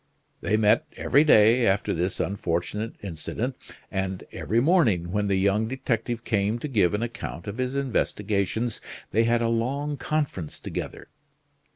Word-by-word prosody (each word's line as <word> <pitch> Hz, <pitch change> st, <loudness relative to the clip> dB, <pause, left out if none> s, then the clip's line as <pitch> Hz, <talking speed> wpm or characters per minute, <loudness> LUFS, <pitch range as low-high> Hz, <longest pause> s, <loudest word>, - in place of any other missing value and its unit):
They 110 Hz, -, +1 dB
met 110 Hz, +1 st, +3 dB
every 145 Hz, -, +4 dB
day 115 Hz, -4 st, +6 dB
after 95 Hz, +1 st, +1 dB
this 90 Hz, +3 st, -2 dB
unfortunate 100 Hz, +3 st, -2 dB
incident; 100 Hz, -, -4 dB, 0.4 s
and 95 Hz, -1 st, -2 dB
every 115 Hz, -, 0 dB
morning, 120 Hz, -, +3 dB
when 105 Hz, +1 st, 0 dB
the 100 Hz, -, +2 dB
young 100 Hz, +3 st, +2 dB
detective 120 Hz, -2 st, -2 dB
came 105 Hz, 0 st, 0 dB
to 135 Hz, -, -4 dB
give 105 Hz, -, +2 dB
an 105 Hz, -, -1 dB
account 115 Hz, -7 st, -6 dB
of 100 Hz, +5 st, -6 dB
his 130 Hz, +1 st, -1 dB
investigations, 110 Hz, -4 st, -1 dB, 0.3 s
they 115 Hz, +3 st, +3 dB
had 120 Hz, 0 st, +2 dB
a 115 Hz, -, +2 dB
long 135 Hz, +6 st, -1 dB
conference 140 Hz, -, -2 dB
together. -, -, -6 dB
110 Hz, 150 wpm, -26 LUFS, 100-125 Hz, 0.4 s, day